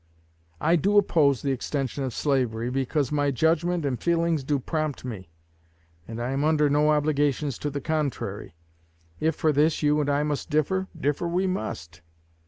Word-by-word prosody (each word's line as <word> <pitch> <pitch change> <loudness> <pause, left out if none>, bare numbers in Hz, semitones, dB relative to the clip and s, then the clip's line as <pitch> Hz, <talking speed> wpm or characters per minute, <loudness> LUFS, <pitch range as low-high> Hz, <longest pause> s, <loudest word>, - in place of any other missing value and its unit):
I 165 +3 +3
do 200 +6 +2
oppose 150 - +3
the 140 - 0
extension 135 +1 -2
of 130 - -2
slavery, 125 -4 0
because 135 +1 -1
my 145 -1 +1
judgment 160 +4 +1
and 125 -5 -2
feelings 170 -3 +1
so 145 - +3
prompt 155 0 -3
me; 100 -8 -7 0.8
and 115 0 -6
I 120 +2 -2
am 135 +2 -1
under 150 -2 +3
no 150 +1 +3
obligations 145 -2 +1
to 145 - -2
the 140 0 -4
contrary. 140 - -3 0.6
If 160 0 +1
for 155 - +2
this 150 +2 +2
you 150 0 +3
and 145 - -1
I 145 +1 +2
must 150 -1 -3
differ, 175 +5 0
differ 145 +4 0
we 180 +3 0
must. 85 - -4
145 Hz, 170 wpm, -26 LUFS, 135-160 Hz, 0.8 s, I